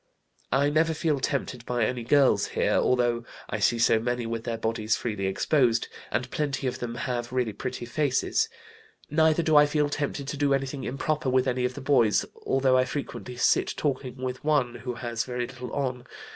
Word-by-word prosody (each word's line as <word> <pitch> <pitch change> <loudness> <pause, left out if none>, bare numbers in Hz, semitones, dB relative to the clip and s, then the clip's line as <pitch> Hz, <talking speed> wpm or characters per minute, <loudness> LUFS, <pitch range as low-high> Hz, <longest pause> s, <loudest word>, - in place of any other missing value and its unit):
"I 140 +2 +3
never 160 +1 +2
feel 150 -2 0
tempted 130 -3 -2
by 120 -2 +1
any 125 +2 -2
girls 125 -5 +4
here, - - +2
although 120 -2 +2 0.3
I 110 - -1
see 105 +4 +3
so 115 -1 +4
many 120 +1 -2
with 115 0 -4
their 115 -1 -2
bodies 110 -1 0
freely 105 -5 -2
exposed, 120 +3 +2 0.2
and 125 +4 -2
plenty 140 -3 -2
of 125 - -2
them 120 -1 -4
have 120 -1 -3
really 125 -4 0
pretty 125 +2 -5
faces. 130 +1 +1 0.6
Neither 160 +1 +3
do 155 -1 +2
I 150 0 +7
feel 150 0 +1
tempted 145 -1 -3
to 145 - -4
do 140 -1 +3
anything 135 0 -3
improper 145 +1 -1
with 130 0 +2
any 125 -1 0
of 125 0 -2
the 145 - -7
boys, 125 -6 +3 0.2
although 130 -1 +3
I 130 - +3
frequently 130 -3 -5
sit - - +2
talking 130 -3 -2
with 130 +1 -4
one 145 -5 +2
who 120 +1 -5
has 115 -1 -3
very 125 -1 -3
little 125 -1 -8
on. 125 -3 -3
130 Hz, 190 wpm, -27 LUFS, 120-140 Hz, 0.6 s, I